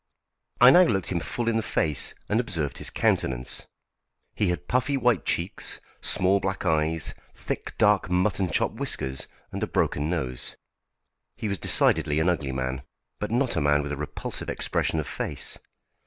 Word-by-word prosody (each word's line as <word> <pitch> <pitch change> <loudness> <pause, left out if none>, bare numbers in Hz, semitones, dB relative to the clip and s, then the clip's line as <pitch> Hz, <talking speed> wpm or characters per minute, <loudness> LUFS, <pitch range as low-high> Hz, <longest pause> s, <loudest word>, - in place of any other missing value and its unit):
I 125 +1 +9
now 180 - +8
looked 95 - +2
him 90 - +1
full 120 +7 -3
in 115 -1 +2
the - - +2
face 75 -8 +1
and 105 - +2
observed 80 - -2
his - - 0
countenance. 65 -1 -1 0.7
He 105 - 0
had 90 - -3
puffy 130 +3 +1
white 120 - +2
cheeks, - - -1 0.2
small 95 +2 +2
black 95 0 -3
eyes, 80 -1 +1 0.2
thick - - -5
dark 105 -3 +3
mutton 90 +1 +1
chop - - +1
whiskers, 65 -1 -3 0.2
and - - -5
a - - 0
broken 75 +2 0
nose. 65 -8 -3 0.8
He 110 - -4
was 100 -2 -2
decidedly 75 +1 +2
an 80 +3 +3
ugly 75 -6 -1
man, 65 0 -2 0.4
but 105 - -2
not 120 +1 +1
a 80 - +1
man 75 0 +3
with 70 - -4
a - - -1
repulsive 75 +1 -5
expression 80 - 0
of 75 - -2
face. - - -2
90 Hz, 170 wpm, -26 LUFS, 75-105 Hz, 0.8 s, I